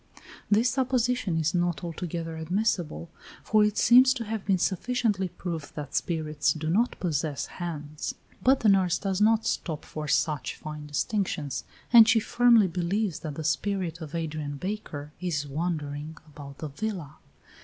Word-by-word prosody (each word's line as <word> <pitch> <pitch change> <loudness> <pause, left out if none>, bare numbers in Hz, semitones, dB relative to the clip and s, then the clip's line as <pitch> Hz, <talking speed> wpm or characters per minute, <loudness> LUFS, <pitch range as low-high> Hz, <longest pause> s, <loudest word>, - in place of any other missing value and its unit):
This 220 +4 +4
supposition 250 -7 +1
is 160 -1 +1
not 175 -4 0
altogether 165 -1 -4
admissible, 170 -1 -1 0.3
for 215 -1 +4
it 210 0 +1
seems 255 +2 +6
to 240 - -3
have 215 -1 -3
been 195 -2 +3
sufficiently 205 +1 0
proved 165 -4 -6
that 145 -3 -6
spirits 155 -3 0
do 155 0 -3
not 230 +7 +1
possess 155 -4 -1
hands. 155 -4 -5 0.3
But 265 +1 +4
the 220 - +4
nurse 185 -3 +3
does 195 -1 -2
not 220 +1 +4
stop 160 -4 -2
for 155 -1 -6
such 150 0 0
fine 150 -1 -8
distinctions, 150 - -2 0.3
and 230 -2 +10
she 225 - +5
firmly 240 -1 +5
believes 180 +1 -1
that 150 -3 -6
the 160 - -5
spirit 165 +3 -1
of 155 0 -7
Adrian 155 -3 -3
Baker 150 -5 -5
is 160 -5 -1
wandering 150 0 -3
about 140 -2 -11
the 155 - -5
villa. 170 -2 -5
170 Hz, 155 wpm, -27 LUFS, 155-210 Hz, 0.3 s, and